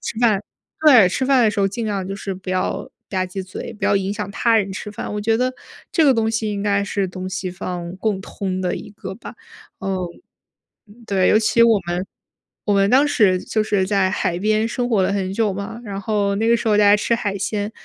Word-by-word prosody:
吃 225 - -5
饭 215 -4 +3 0.4
对， 250 -12 +7
吃 260 +8 -1
饭 260 -3 +4
的 215 - +4
时 205 - -2
候 195 - +3
尽 225 +3 -4
量 195 -3 -2
就 195 +1 -5
是 195 -1 -5
不 185 0 -7
要 185 0 -2 0.2
吧 185 -2 -1
唧 185 +1 -5
嘴， 185 - -7
不 210 -2 -6
要 - - +3
影 195 +1 -1
响 210 -1 -4
他 230 +2 +3
人 200 -2 0
吃 210 +1 -6
饭， 210 0 -6
我 210 - -2
觉 225 +1 +2
得 255 +1 0 0.4
这 320 - +4
个 275 - +6
东 225 -2 +1
西 220 -1 -1
应 200 -1 -3
该 200 -1 +1
是 200 -1 -1
东 185 0 -6
西 185 0 -3
方 180 0 -6
共 205 -2 -1
通 190 -1 -4
的 180 -1 -1
一 - - -8
个 190 -2 -8
吧， 230 - -10 0.5
嗯。 195 0 -2 1.1
对， 190 -2 +2
尤 215 - +5
其 230 +1 +3
我 225 -3 +5
们， 175 +2 -2 0.6
我 205 - +2
们 200 0 +3
当 275 +4 +5
时 190 -9 +3
就 215 +3 -1
是 200 -3 +1
在 195 -2 +2
海 175 -2 -1
边 215 +2 +1
生 245 +1 -2
活 210 -5 +3
了 200 - +1
很 190 -2 -1
久 210 -2 +1
嘛， 200 +4 -6
然 200 -1 -5
后 200 -2 0
那 225 +2 0
个 235 - +5
时 230 - -3
候 210 -1 +4
大 210 - +5
家 205 +1 +6
吃 235 +2 +1
海 200 -3 -2
鲜， 205 +2 -2
205 Hz, 255 characters per minute, -21 LUFS, 190-220 Hz, 1.1 s, 对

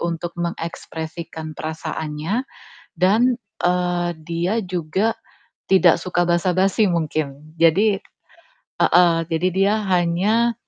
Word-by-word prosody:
untuk 170 0 -3
mengekspresikan 165 -1 -5
perasaannya 160 - -4 0.5
dan, 225 +7 +3 0.3
eee, 175 0 +1
dia 170 +4 -1
juga 185 +4 -1 0.5
tidak 185 -3 +5
suka 175 -1 0
basa-basi 185 +4 +2
mungkin. 155 -2 -3
Jadi 195 +5 +4 0.8
heeh, 175 -1 +5
jadi 165 +3 +1
dia 195 +2 +3
hanya, 190 +6 +2
175 Hz, 90 wpm, -21 LUFS, 165-190 Hz, 0.8 s, tidak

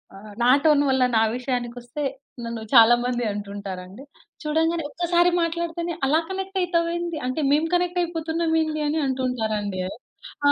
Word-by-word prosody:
ఆ! - - -10 0.2
నా - - +3 0.2
టోను 300 -2 +5
వల్ల 265 -1 +3
నా - - +5 0.2
విషయానికొస్తే, 245 +1 -4 0.4
నన్ను 230 -1 -5
చాలా 235 -1 +8
మంది 245 -1 -1
అంటుంటారండి. 200 +1 -7 0.4
"చూడంగానే 325 +2 +1
ఒక్కసారి 345 +2 +2
మాట్లాడితేనే 340 0 -2
అలా 305 +4 +3
కనెక్టయితావేంది, 345 -3 -1
అంటే, 255 +5 -2
మేము 305 +3 +3
కనెక్టయిపోతున్నామేంది" 330 -3 0
అని 310 +2 0
అంటుంటారండీ. 220 -7 -2 0.7
ఆ! - - +7
305 Hz, 120 wpm, -24 LUFS, 240-335 Hz, 0.7 s, చాలా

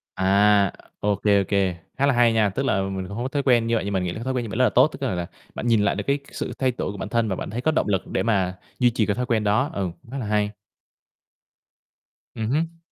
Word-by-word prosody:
À, 100 +1 +4 0.3
ô 105 0 +1
kê, 100 0 +3
ô - - 0
kê, 95 -3 +1 0.2
khá 140 - +2
là 140 - +3
hay 120 -1 +4
nha, 110 -2 +3
tức 135 +8 -2
là 95 -7 +2
mình 95 -1 -3
cũng 100 - -7
hông 120 - -2
có 130 - -2
thói 140 -1 -1
quen 120 -3 +3
như 115 - +2
vậy, 110 - 0
nhưng 100 - -2
mình 95 -1 0
nghĩ 90 - -2
là - - -7
cái 115 - -6
thói 130 - -2
quen 125 -2 -1
như 110 - -6
vậy 110 - -4
rất 130 - +4
là 120 - +5
tốt. 130 +7 +5
Tức 150 - -11
là 125 -9 -1
là 85 -1 -3 0.3
bạn - - -3
nhìn 115 -3 +4
lại 100 - +2
được - - -3
cái 140 +1 +2
sự - - -4
thay 130 -1 +2
đổi - - -2
của 100 - -8
bản 100 +1 -5
thân 115 -1 +1
và 95 - -1
bạn - - -5
thấy 115 +4 -4
có 155 - +2
động 155 - 0
lực 95 -3 0
để - - -1
mà 95 -5 +1 0.2
duy 125 - +5
trì 115 -3 +1
cái 100 - 0
thói 125 - -1
quen 115 -3 +1
đó. 110 +8 +2
Ừm, 95 -3 -2
cũng 115 - -17
khá 140 - -4
là 125 - -3
hay. 105 0 +1 1.8
Ừm 110 0 -2
hứm. 165 +4 -1
110 Hz, 305 wpm, -24 LUFS, 100-125 Hz, 1.8 s, là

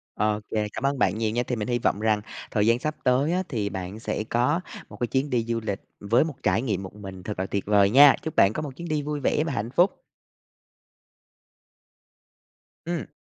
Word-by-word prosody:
Ô 105 0 +1
kê, 105 -1 0
cảm 135 - -2
ơn 140 -1 0
bạn 95 -1 +2
nhiều 110 -1 0
nha. 120 +3 0
Thì 125 - -2
mình 105 +1 -3
hy 120 -1 +1
vọng 105 -3 0
rằng 110 -1 +2 0.3
thời 105 -1 +1
gian 115 +1 +4
sắp 150 +4 -3
tới 135 +6 +3
á 185 - +1
thì 105 -6 -1
bạn 95 +2 -6
sẽ 110 - -3
có 125 +9 +1 0.3
một 105 - -11
cái 120 - +1
chuyến 135 +4 -1
đi 120 -3 +1
du 115 0 -2
lịch 100 -3 -3 0.2
với 115 +8 +3
một 155 -4 -4
trải 105 +6 +2
nghiệm 100 -7 -1
một 95 - -9
mình 95 -3 -9
thật 105 0 -5
là 95 - -1
tuyệt 100 0 -3
vời 100 -1 +4
nha! 140 +4 +8
Chúc 160 - -5
bạn 95 - +5
có 155 - -3
một 145 - -4
chuyến 170 +1 -7
đi 155 -2 0
vui 150 0 -3
vẻ 150 +3 +1
và 165 - -2
hạnh 115 0 -3
phúc. 175 +8 +2 2.9
Ừm. 170 -1 -3
115 Hz, 225 wpm, -25 LUFS, 105-140 Hz, 2.9 s, nha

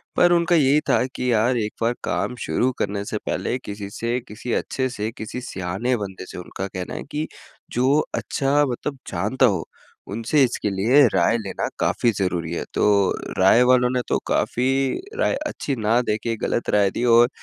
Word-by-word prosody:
पर 175 - +5
उनका 170 0 +3
यही 145 -1 +4
था - - +4
कि 125 -1 0
यार, 120 +3 +2
एक 105 -2 -2
बार 115 +1 +2
काम 125 - -1
शुरू 130 +1 +1
करने 100 0 -1
से 105 - -3
पहले 125 - -1
किसी 100 -1 -6
से 120 +2 0
किसी 110 +3 -5
अच्छे 130 -1 -1
से, 110 -2 -4
किसी 110 +3 -6
सयाने 100 +3 -2
बंदे 95 -3 -6
से, - - -9
उनका 90 +2 -5
कहना 95 -2 -6
है - - -5
कि 155 +1 -2 0.4
जो 130 +5 +3 0.2
अच्छा, 145 +1 +1
मतलब 140 +3 -4
जानता 110 +9 +1
हो, 95 -8 +1 0.5
उनसे 115 +7 +2
इसके 120 -4 0
लिए 110 +9 +3
राय 95 +5 +3
लेना 105 -4 -3
काफ़ी 120 - +2
ज़रूरी 85 -3 -1
है। - - -2
तो - - 0 0.6
राय 95 +6 +6
वालों 125 -1 +5
ने 125 - +1
तो - - +2
काफ़ी 125 +2 +1 0.5
राय - - +2
अच्छी 140 - -3
ना 110 +1 +2
दे 105 -3 0
के 115 -1 -1
गलत 120 - -1
राय 100 -2 +3
दी, 120 - -3
और 120 0 +6
115 Hz, 185 wpm, -23 LUFS, 100-130 Hz, 0.6 s, राय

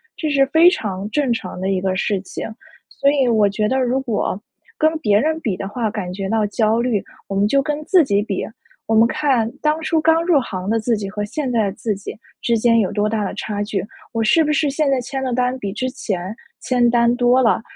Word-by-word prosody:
这 310 - -3
是 275 -2 +3
非 320 +5 +6
常 205 - -3
正 275 +1 0
常 185 -5 -6
的 190 +1 -2
一 190 -1 0
个 190 0 -1
事 195 +1 -1
情。 190 - -6 0.4
所 280 - +1
以 275 -3 +2
我 215 -3 +4
觉 210 +1 -1
得 260 +4 +1
如 255 +1 +1
果 220 -6 -2 0.4
跟 315 0 +2
别 210 -8 +3
人 315 +5 0
比 220 -11 -2
的 195 - -5
话 225 +1 -2
感 200 -5 -4
觉 195 0 -4
到 220 0 +1
焦 220 +2 +1
虑， 235 -5 0 0.3
我 195 - -4
们 200 +1 +2
就 275 +5 +3
跟 295 +1 -3
自 365 -1 +5
己 200 -5 +1
比。 205 -3 -3 0.4
我 225 - +1
们 225 +1 +6
看 260 -6 +1
当 305 +1 +1
初 320 0 +1
刚 325 +1 +3
入 340 -4 +4
行 190 -7 -5
的 225 +1 +2
自 225 +1 0
己 205 -1 -4
和 210 0 -3
现 270 +6 -3
在 225 -3 +2
的 195 - -1
自 210 +1 -3
己 195 - -8 0.2
之 235 -1 +1
间 230 +1 +3
有 200 - 0
多 210 0 0
大 215 -1 -1
的 195 - -3
差 205 -1 -4
距， 205 -1 -3 0.3
我 225 - -1
是 320 +9 +4
不 300 - 0
是 300 0 +1
现 290 +1 0
在 270 - +2
签 265 +2 -4
的 260 - -2
单 250 +1 0
比 200 -5 -4
之 235 +6 -3
前 200 -7 -4 0.2
签 245 -2 +2
单 235 0 +3
多 245 +1 +3
了？ 225 - +3
230 Hz, 260 characters per minute, -20 LUFS, 205-270 Hz, 0.4 s, 非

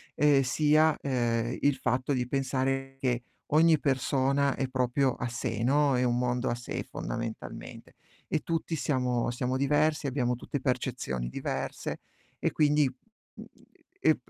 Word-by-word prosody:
ehm, 145 -2 +5
sia, 150 +4 +3
uhm, 120 -3 0
il 145 -1 +3
fatto 130 +3 0
di 125 -1 -1
pensare 135 0 -1
che 125 -2 0 0.2
ogni 160 0 +5
persona 135 0 +1
è 135 - -1
proprio 130 +1 +1
a 120 - -3
sé, 115 -1 -3
no. 140 0 +3
È 125 - +2
un 120 -1 +2
mondo 125 0 0
a 120 - 0
sé 120 0 -5
fondamentalmente. 115 -1 -6 0.3
E 155 - 0
tutti 165 0 -2
siamo 125 -5 0
siamo 125 +1 -1
diversi, 150 +2 +2
abbiamo 125 -2 0
tutte 140 +3 -4
percezioni 65 - -2
diverse - - -4 0.4
e - - 0
quindi, 150 -2 +3 0.5
mhmm, - - -11 0.5
è - - +5
130 Hz, 145 wpm, -29 LUFS, 125-145 Hz, 0.5 s, ehm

